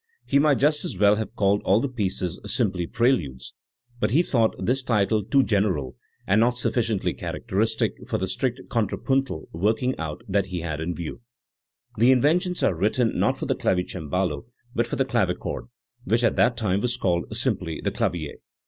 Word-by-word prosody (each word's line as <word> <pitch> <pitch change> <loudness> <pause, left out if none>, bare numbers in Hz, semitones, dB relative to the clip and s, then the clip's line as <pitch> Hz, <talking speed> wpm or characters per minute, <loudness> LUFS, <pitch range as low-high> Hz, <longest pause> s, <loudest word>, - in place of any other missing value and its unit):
He 140 - +3
might 145 -2 +4
just 150 +2 +2
as - - -4
well 105 +1 +5
have 110 - -4
called 100 0 +2
all 100 +3 +4
the 140 - 0
pieces 95 -7 -2
simply 95 -7 0
"pre 120 +2 +3
ludes"; 65 - -3 0.5
but 105 - +1
he 150 +10 +3
thought 115 -8 +1
this 130 +3 0
title 110 -3 +1
too 135 +7 +3
general 95 - 0 0.3
and 100 +3 +3
not 120 +1 +2
suf 125 - 0
ficiently 115 -5 0
characteristic - - -1 0.2
for - - 0
the 95 - -1
strict 125 +6 -1
contrapuntal 125 - -1
working 110 +9 0
out 80 +7 -5
that 100 -1 +1
he 90 -2 -4
had 80 -2 -4
in 85 +2 -3
view, 85 +7 -6 0.8
The 120 +3 +6
Inventions 170 +8 +2
are - - +3
written 110 +7 +1
not - - +2
for - - -4
the - - +1
clavicembalo 90 +2 -1 0.3
but 120 -2 0
for - - -3
the 135 - +1
clavichord, 105 -9 -1 0.4
which 115 +2 +1
at 115 - +3
that 120 -1 +3
time 100 -4 +1
was 120 +1 0
called 85 -2 0
simply 95 - -1
the - - -1
"clavier". 80 -4 -2
105 Hz, 185 wpm, -25 LUFS, 90-125 Hz, 0.8 s, The